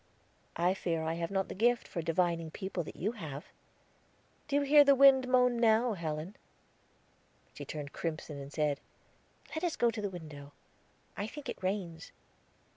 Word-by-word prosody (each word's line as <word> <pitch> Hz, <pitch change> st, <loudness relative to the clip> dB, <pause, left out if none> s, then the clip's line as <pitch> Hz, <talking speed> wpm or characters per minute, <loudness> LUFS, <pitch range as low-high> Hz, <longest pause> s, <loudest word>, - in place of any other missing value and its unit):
"I 175 Hz, +2 st, +2 dB
fear 165 Hz, -4 st, -2 dB
I 160 Hz, +1 st, -1 dB
have 170 Hz, 0 st, -3 dB
not 195 Hz, -1 st, 0 dB
the -, -, -6 dB
gift 240 Hz, +4 st, +2 dB
for 170 Hz, -, -4 dB
divining 165 Hz, 0 st, 0 dB
people 190 Hz, +2 st, -4 dB
that -, -, -9 dB
you 200 Hz, +7 st, -1 dB
have." 155 Hz, -, -7 dB, 1.0 s
"Do 285 Hz, -, -1 dB
you 290 Hz, -, +4 dB
hear 290 Hz, +1 st, +7 dB
the 280 Hz, -1 st, +6 dB
wind 265 Hz, -1 st, +7 dB
moan 250 Hz, -1 st, +3 dB
now, 230 Hz, +1 st, +4 dB
Helen?" 165 Hz, +1 st, -4 dB, 1.2 s
She -, -, -8 dB
turned 145 Hz, -2 st, -6 dB
crimson, 155 Hz, -3 st, -4 dB
and 140 Hz, +1 st, -9 dB
said: 150 Hz, -2 st, 0 dB, 0.7 s
"Let 315 Hz, +2 st, -3 dB
us 345 Hz, -3 st, 0 dB
go 235 Hz, -1 st, +3 dB
to 220 Hz, -1 st, -5 dB
the 205 Hz, -, -1 dB
window; 150 Hz, -5 st, -10 dB, 0.6 s
I 205 Hz, -, -3 dB
think 290 Hz, +5 st, -8 dB
it -, -, -6 dB
rains." 185 Hz, -4 st, -3 dB
185 Hz, 170 wpm, -32 LUFS, 160-240 Hz, 1.2 s, hear